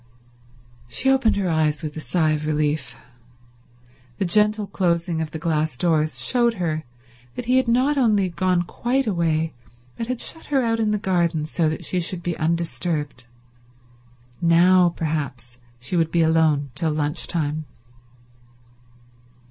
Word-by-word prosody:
She 260 - +1
opened 265 -5 +3
her 200 -2 -1
eyes 155 -1 +1
with 150 -1 -5
a - - -5
sigh 155 0 +1
of 150 0 -2
relief. 150 -5 -1 1.2
The 195 - 0
gentle 210 +3 +2
closing 170 -3 -1
of 160 - -3
the 160 - -6
glass 155 -4 -1
doors 155 0 +1
showed 235 -2 +2
her 160 -5 -2 0.5
that 245 - -5
he 250 +2 +3
had 260 - +2
not 260 +5 +2
only 210 -6 +3
gone 180 0 +1
quite 255 +9 -1
away 165 -5 0 0.4
but 230 - -4
had 255 -1 -3
shut 325 - -2
her 275 -3 +1
out 225 -1 0
in 220 -1 +1
the 210 - +1
garden 170 -6 0
so 155 0 0
that 155 - -4
she 180 - 0
should 175 0 -1
be 175 -1 -2
undisturbed. 160 -5 -2 1.1
Now 175 +1 +5
perhaps 140 -7 -4 0.2
she 125 +9 -4
would 165 -2 +2
be 170 0 +2
alone 160 -4 +2
till 165 +3 -1
lunch 150 +1 -1
time. 155 -2 -2
170 Hz, 150 wpm, -22 LUFS, 155-200 Hz, 1.2 s, Now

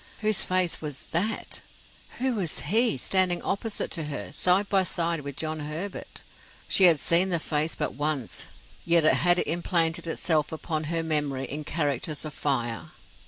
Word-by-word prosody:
Whose 215 -2 +2
face 185 -2 0
was 150 -1 -5
that, 200 +7 -2 0.6
who 260 +1 0
was 190 -8 -2
he, 220 - +2
standing 185 +5 +2
opposite 205 +2 -2
to 165 -4 -2
her, 145 -1 -5
side 185 +5 +2
by 195 -2 +3
side 170 -2 -2
with 140 -1 -7
John 155 0 -3
Herbert? 155 +7 -6 0.5
She 190 - +6
had 165 -4 +6
seen 175 +5 +4
the 175 - +1
face 155 0 -1
but - - -3
once, 145 -3 -2 0.4
yet 170 -2 +4
it - - +6
had 175 0 +4
implanted 170 0 0
itself 160 -2 0
upon 160 -1 -3
her 165 +1 -1
memory 145 -4 -1
in 150 +3 -5
characters 145 -1 -2
of 155 - -6
fire. 120 -6 -2
165 Hz, 165 wpm, -26 LUFS, 150-180 Hz, 0.6 s, She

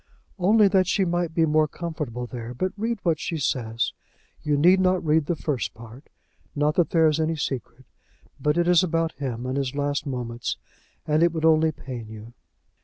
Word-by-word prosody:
"Only 205 +3 +5
that 190 -2 +3
she 195 0 +2
might 175 -1 -1
be 165 - +4
more 155 0 +3
comfortable 150 -7 -5
there. 120 0 -7
But 185 +8 -1
read 225 +3 -2
what 165 -3 +1
she 165 - -3
says. 115 -5 -1 0.5
You 150 -1 0
need 180 +6 +5
not 185 -1 +2
read 155 -1 +2
the 175 - 0
first 145 -7 -3
part. 115 +5 -13 0.5
Not 150 +1 +2
that 175 0 +2
there 165 -1 +3
is 155 0 +2
any 160 +1 0
secret; 130 -3 -5 0.5
but 150 +4 +1
it 175 0 +2
is 180 0 +5
about 165 -2 0
him 125 -4 -5
and 130 +1 -2
his 135 -1 -2
last 145 0 -1
moments, 120 -3 -4 0.5
and 155 +1 +2
it 170 0 +4
would 160 -1 -2
only 160 0 +4
pain 125 -6 -8
you." 110 +2 -10
155 Hz, 190 wpm, -24 LUFS, 130-170 Hz, 0.5 s, Only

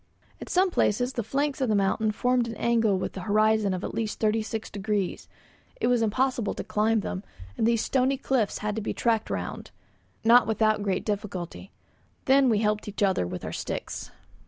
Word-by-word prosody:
At - - -7
some 370 +1 +3
places 245 -2 +1
the 240 - -1
flanks 275 +5 -1
of 260 - +1
the 215 - +3
mountain 205 +2 +1
formed 245 +2 +1
an 230 - -5
angle 225 -3 +2
with 185 - -3
the - - -6
horizon 215 +1 +2
of 185 +1 -3
at - - -4
least 220 -2 -3
36 220 0 -1
degrees; 200 -2 -2 0.5
it - - 0
was 245 -1 +3
impossible 240 0 0
to - - -4
climb 215 +1 +1
them, 190 0 -4 0.3
and 220 - +1
these 230 -1 +2
stony 265 +1 +1
cliffs 255 -6 0
had 210 -1 -1
to 220 - -2
be 215 - -3
tacked 225 -2 +1
round, - - -4 0.5
not 235 +2 +6
without 215 -1 +2
great 195 -2 -1
difficulty. 195 -3 -4 0.5
Then 270 0 +5
we 220 - +3
helped 210 0 0
each 205 0 -2
other 190 - +2
with 90 - -6
our - - -4
sticks. - - -5
220 Hz, 190 wpm, -27 LUFS, 205-240 Hz, 0.5 s, not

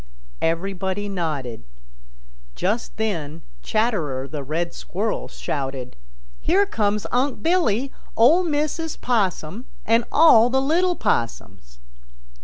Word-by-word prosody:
Everybody 190 +4 -1
nodded. 150 - -3 0.9
Just 215 +5 -2
then 165 -8 -3 0.2
Chatterer 165 - 0
the 150 0 -5
Red 165 +5 -2
Squirrel 210 +5 -3
shouted, 135 -3 -4 0.4
"Here 390 +5 +3
comes 210 - 0
Unc' 255 +2 0
Billy, 275 - +2 0.3
Ol' 300 +11 +6
Mrs. 310 0 -2
Possum 210 -2 -1 0.2
and 230 +2 +3
all 245 -7 +7
the 265 +1 +2
little 345 +6 +2
Possums." 115 - -2
210 Hz, 100 wpm, -23 LUFS, 160-265 Hz, 0.9 s, all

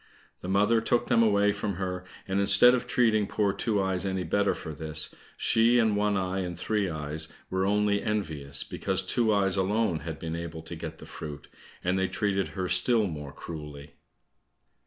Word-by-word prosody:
The 90 - -6
mother 105 +4 +3
took 120 +1 0
them 115 - +4
away 105 -2 +3
from 105 -1 -3
her, 90 0 -4 0.2
and 95 +1 0
instead 100 +5 +7
of 125 -1 -1
treating 110 -4 +2
poor 100 -1 0
Two 105 -1 0
eyes 95 -1 -1
any 95 -1 -2
better 100 +4 +1
for 80 - -7
this, 80 +1 0 0.2
she 115 +2 +3
and 110 -3 +3
One 105 0 +1
eye 95 0 -1
and 90 -2 -4
Three 105 0 -1
eyes 75 0 -3 0.2
were 95 +1 0
only 105 0 +2
envious, 75 -10 -3
because 95 -1 -2
Two 110 +4 +2
eyes 100 -2 +2
alone 95 -2 +1
had 80 -2 -6
been 80 0 -5
able 85 -1 -6
to 80 +1 -7
get 80 -1 -7
the - - -11
fruit, 75 -1 -8 0.3
and 90 +2 +1
they 95 - +1
treated 95 -1 -1
her 95 -1 -1
still 105 +6 +3
more 75 -6 -6
cruelly. 75 -3 -9
95 Hz, 185 wpm, -28 LUFS, 85-105 Hz, 0.3 s, instead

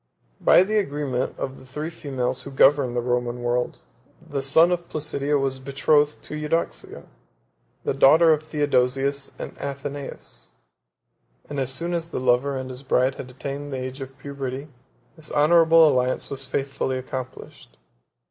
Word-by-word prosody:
5 - - -21
By - - +7
the 215 +2 +1
agreement 140 -7 -2
of 135 0 -5
the - - -15
three 150 +5 -5
females 130 -5 -3
who - - -8
governed 135 -2 +4
the 120 - 0
Roman 120 0 -1
world, 120 +1 -1 0.4
the 145 -4 -4
son 160 +6 +5
of 175 -1 -2
Placidia 150 -1 -1
was 135 -1 -1
betrothed 145 +2 +1
to - - -9
Eudoxia, 150 +2 -3 0.8
the - - 0
daughter 160 +4 +6
of 155 - -1
Theodosius 140 -2 0
and - - -7
Athenais; 140 0 -7 0.9
and 145 - -4
as 135 -1 0
soon 170 +6 -3
as 165 -1 -2
the - - -3
lover 130 +2 +2
and 130 0 -5
his 125 +1 -8
bride 130 -1 +2
had 130 - -8
attained 140 +3 -6
the 135 - -3
age 130 +1 -6
of 135 0 -8
puberty, 140 0 -6 0.5
this 160 -2 -9
honorable 165 +1 +6
alliance 130 -2 0
was 135 -1 -5
faithfully 135 -1 -2
accomplished. 130 - -8
140 Hz, 155 wpm, -24 LUFS, 130-150 Hz, 0.9 s, By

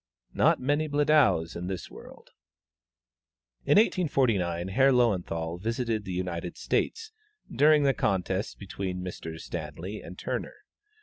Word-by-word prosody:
Not - - +3
many 145 +4 0
Bledows 145 - +3
in 90 +1 -5
this 95 -1 -5
world! - - -13 1.3
In - - +4
1849, 115 - +2
Herr 135 +7 +4
Löwenthal 90 -8 0
visited 115 -1 -2
the 95 - -5
United 90 -1 -4
States, 450 -1 -1 0.4
during 150 0 +5
the 135 -1 +4
contest 95 -1 -1
between 95 -2 -5
Messrs. 80 -3 -7
Stanley 80 +7 -6
and - - -10
Turner. - - -4
100 Hz, 120 wpm, -28 LUFS, 90-135 Hz, 1.3 s, during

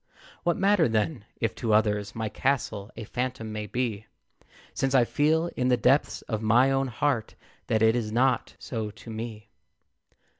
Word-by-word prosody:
What 175 -2 +1
matter, 195 -7 +3
then, 110 +2 -1
if 115 -1 0
to 115 -3 0
others 105 -1 +1
My 110 -1 -2
castle 110 -5 -1
a 115 - -5
phantom 125 -1 -4
may 105 0 -4
be, 110 -3 -2 0.7
Since 135 0 0
I 125 -3 +6
feel, 160 +6 +1
in 125 - 0
the 125 -1 +4
depths 130 +6 +2
of 110 -2 -3
my 120 +5 +4
own 135 0 +1
heart, 120 0 -1 0.3
That 110 0 +2
it 110 +1 +5
is 110 -3 -2
not 125 +2 +1
so 110 -4 -4
to 110 +2 -11
me? 110 -1 -7
115 Hz, 165 wpm, -27 LUFS, 110-135 Hz, 0.7 s, I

